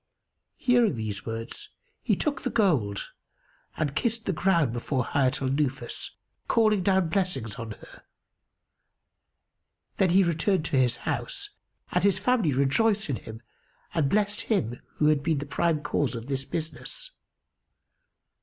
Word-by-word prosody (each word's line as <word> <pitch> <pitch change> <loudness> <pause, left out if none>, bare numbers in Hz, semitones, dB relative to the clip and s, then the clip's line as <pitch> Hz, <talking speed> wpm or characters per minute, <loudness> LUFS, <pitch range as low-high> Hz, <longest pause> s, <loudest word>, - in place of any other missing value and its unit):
Hearing 245 - +3
these 110 -2 -4
words 115 +1 -4 0.3
he - - +2
took 295 -2 -1
the - - -1
gold 135 - +1 0.7
and 145 -2 -1
kissed 225 +5 0
the 190 - 0
ground 170 -7 +2
before 125 +1 -1
Hayat 135 -1 +1
al 130 - +1
Nufus, 135 -1 -2 0.3
calling 215 -4 +3
down 190 -2 +2
blessings 165 - -1
on 115 -2 -6
her. - - -15 2.0
Then 190 - +3
he 190 +3 +5
returned 170 +1 +1
to 150 - -1
his 125 -2 +3
house, - - -3 0.4
and 180 - +1
his 200 -2 +4
family 210 -5 +2
rejoiced 175 - +2
in 125 - -1
him 110 +1 -10 0.5
and 150 -4 +2
blessed 205 +2 0
him[FN#285] 120 - 0
who 150 - +1
had 150 -2 +3
been 160 +1 +1
the 140 - -3
prime 155 +1 0
cause 145 -4 0
of 115 0 -6
this 135 0 -2
business. - - -5
155 Hz, 145 wpm, -27 LUFS, 130-195 Hz, 2.0 s, he